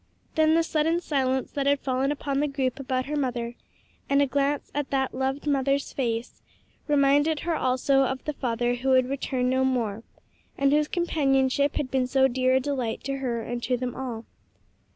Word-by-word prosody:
Then 315 0 +4
the 330 - +3
sudden 325 +1 +1
silence 265 -5 -1
that 280 -1 -1
had 285 0 +3
fallen 265 +1 0
upon 280 -1 -2
the 295 - +1
group 270 -2 -2
about 255 -1 -2
her 300 - -3
mother, 245 -4 -2 0.6
and 280 0 +3
a 285 - +5
glance 280 +1 -1
at 290 -1 -2
that 265 -1 0
loved 265 +2 -2
mother's 275 -1 0
face, 235 -2 -3 0.5
reminded 290 +1 +3
her 340 - -1
also 265 0 +2
of 265 -1 -1
the 300 - -2
father 240 -2 -1
who 245 +2 -2
would 255 -1 +4
return 260 -2 -1
no 260 +1 +2
more, 230 -5 0 0.6
and 275 0 +3
whose 300 +1 +3
companionship 280 -5 +1
had 260 -3 -2
been 260 -1 +1
so 265 +1 +4
dear 255 0 +1
a - - +4
delight 255 -4 -3
to 275 0 -3
her 240 -4 -2
and 240 +1 -4
to 250 +1 0
them 250 0 -3
all. 240 -4 -5
270 Hz, 190 wpm, -26 LUFS, 255-285 Hz, 0.6 s, a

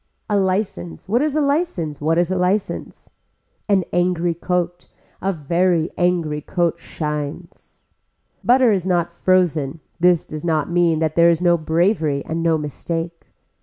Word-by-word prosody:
A - - +3
license, 185 - -1
what 230 +6 +2
is 300 -1 0
a 305 - +2
license, 280 - -1
what 160 +2 +1
is 175 +1 +1
a - - +1
license. 185 +3 -2 0.6
An 190 -3 +3
angry 175 -1 +1
coat, 175 +1 -2 0.3
a 195 - 0
very 170 +1 +1
angry 170 -4 0
coat 170 +1 -1
shines. 150 +2 -6 0.6
Butter 250 -1 +5
is 190 -3 0
not 175 -2 +1
frozen, 165 -6 +1 0.2
this 175 -1 +3
does 155 -1 -7
not 160 -2 0
mean 170 -2 +3
that 155 -1 0
there 170 0 +6
is 165 -1 +2
no 175 -1 +4
bravery 160 -2 0
and 165 +1 -3
no 165 -1 +2
mistake. 165 +3 -5
170 Hz, 150 wpm, -20 LUFS, 160-185 Hz, 0.6 s, there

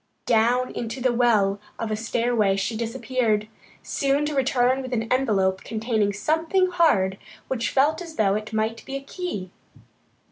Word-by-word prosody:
Down 240 +2 +2
into 230 +3 -5
the 250 -1 +1
well 215 -5 +3 0.2
of 225 -1 -3
a - - +1
stairway 225 -2 +1
she 195 +3 -2
disappeared, 225 -1 -1 0.4
soon 280 +1 0
to 300 - -2
return 260 -1 +2
with 255 -1 -6
an 225 -2 0
envelope 195 -8 +1
containing 220 -2 0
something 325 - +1
hard, 200 - +2 0.3
which 240 -3 -1
felt 300 +5 +2
as 330 -2 -8
though 200 -6 +2
it 215 +1 -3
might 220 +1 -1
be 270 - -6
a 275 - -5
key. 275 - -5
235 Hz, 155 wpm, -24 LUFS, 215-270 Hz, 0.4 s, well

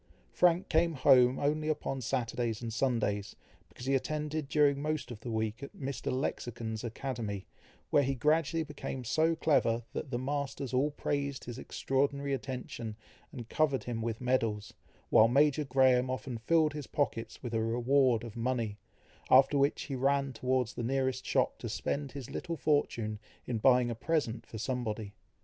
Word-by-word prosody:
Frank 175 +1 +3
came 165 +1 +2
home 130 -2 +5
only 155 +2 0
upon 140 -3 -2
Saturdays 115 -2 -1
and 115 -2 -5
Sundays, 105 -6 0 0.3
because 125 - -10
he 135 - +1
attended 150 +1 -1
during 145 -2 +3
most 155 -3 -2
of 115 - -7
the 120 - -7
week 110 +1 -2
at 140 - -9
Mr. 135 0 -3
Lexicon's 120 -3 -3
academy, 115 -4 -4 0.5
where 145 - +5
he 135 0 0
gradually 160 +4 +2
became 145 -3 -6
so 160 +7 +2
clever, 120 -7 +2
that - - -4
the 120 - -1
masters 140 0 -3
all 135 +4 +3
praised 140 -1 -2
his 120 +1 -7
extraordinary 140 +2 -1
attention, 125 -4 -5 0.4
and 120 -2 -8
covered 145 0 +1
him 120 -2 -3
with 115 -1 -2
medals, 115 -5 0 0.4
while 110 - +7
Major 145 +4 +3
Graham 130 -1 +4
often 130 -2 -4
filled 155 +5 +3
his 150 -2 -6
pockets 140 -5 -2
with 120 -2 -5
a 110 - +1
reward 120 +1 +2
of 115 -3 -8
money, 115 -3 -2 0.5
after 135 +2 +6
which 140 +1 +2
he 140 - -4
ran 140 +1 +1
towards 125 0 0
the - - -5
nearest 130 +1 -1
shop - - +1
to - - -5
spend 140 -2 -3
his 135 -4 -6
little 170 -2 -4
fortune 115 -9 0 0.3
in 115 -3 -2
buying 125 0 +4
a - - -1
present 120 -3 -1
for 110 - -8
somebody. 110 -4 -3
130 Hz, 165 wpm, -31 LUFS, 115-140 Hz, 0.5 s, while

